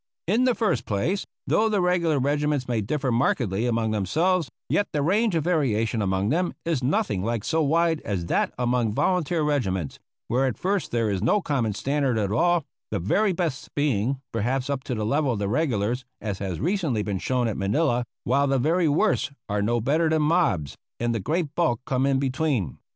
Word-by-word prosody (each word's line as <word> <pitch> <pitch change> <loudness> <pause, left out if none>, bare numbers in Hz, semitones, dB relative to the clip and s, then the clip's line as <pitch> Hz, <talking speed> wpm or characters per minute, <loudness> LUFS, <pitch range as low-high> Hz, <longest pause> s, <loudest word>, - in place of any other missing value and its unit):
In 225 +8 +2
the 250 -2 +3
first 155 - 0
place, 135 - -1 0.2
though 220 +1 +2
the 210 -2 +1
regular 175 -4 +2
regiments 145 0 0
may 120 -3 0
differ 135 +5 -1
markedly 115 -3 +1
among 115 -2 0
themselves, 155 - +1 0.2
yet 205 - +1
the 145 -2 +1
range 205 +4 +2
of 160 - +1
variation 120 -10 +1
among 95 +1 0
them 175 +6 0
is 165 -6 0
nothing 135 - 0
like 115 -1 -1
so 160 0 +1
wide 160 +2 +2
as 95 -5 -2
that - - +1
among 120 -3 +1
volunteer 175 -3 +1
regiments, 95 - -1 0.3
where 130 +3 +1
at 130 - -3
first 195 +1 -1
there 115 -3 0
is 95 -2 -1
no 130 - +3
common 135 - -1
standard 135 -1 0
at 100 -2 0
all; 170 +6 +2 0.2
the - - -1
very 195 - +1
best 170 -7 -3
being, 135 -3 0
perhaps, 125 +5 -1
up 135 -2 -2
to 125 - -2
the 110 -1 -2
level 140 +2 +1
of - - -3
the 100 -1 -1
regulars 120 -2 0 0.2
(as 105 -3 -4
has 95 -4 -3
recently 160 - 0
been 100 -3 -2
shown 125 +3 0
at 110 - -2
Manila), 120 +5 +1 0.2
while 140 +4 +2
the 135 0 +2
very 160 +6 +2
worst 155 +2 +1 0.2
are 105 0 -1
no 120 +3 +1
better 155 +8 +1
than 155 -1 +2
mobs, 150 - +1 0.2
and 120 0 0
the 115 - -1
great 155 - -1
bulk 125 -10 +1
come 130 +1 +1
in 135 -1 +2
between. 130 - -1
135 Hz, 195 wpm, -25 LUFS, 110-165 Hz, 0.3 s, the